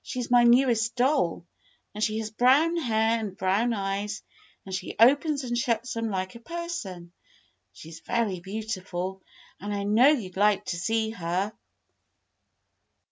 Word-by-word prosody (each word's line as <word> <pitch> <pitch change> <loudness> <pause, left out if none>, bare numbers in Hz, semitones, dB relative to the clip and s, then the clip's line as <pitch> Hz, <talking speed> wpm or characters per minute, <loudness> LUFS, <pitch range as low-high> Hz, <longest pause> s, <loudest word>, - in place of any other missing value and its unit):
She's 250 -1 -5
my 240 -1 +6
newest 235 -2 +3
doll, 250 - +1 0.5
and 210 - -3
she 215 0 0
has 220 -1 -4
brown 270 +9 +4
hair 225 -6 +1
and 205 -4 -6
brown 195 +6 +1
eyes 200 0 -3 0.4
and 190 - -8
she 185 - -4
opens 280 +4 +4
and 240 -1 -2
shuts 235 0 -1
them 230 -1 -2
like 185 -2 -3
a 235 - -11
person. 235 - -6 0.6
She 160 - -12
's 165 - -10
very 205 -2 -1
beautiful, 190 -2 -5 0.4
and 205 +1 -5
I 200 -1 -2
know 215 +6 +5
you 240 -11 +1
'd 185 - -14
like 205 0 +3
to 175 - -3
see 220 +4 0
her." 185 +1 -2
220 Hz, 155 wpm, -26 LUFS, 190-240 Hz, 0.6 s, my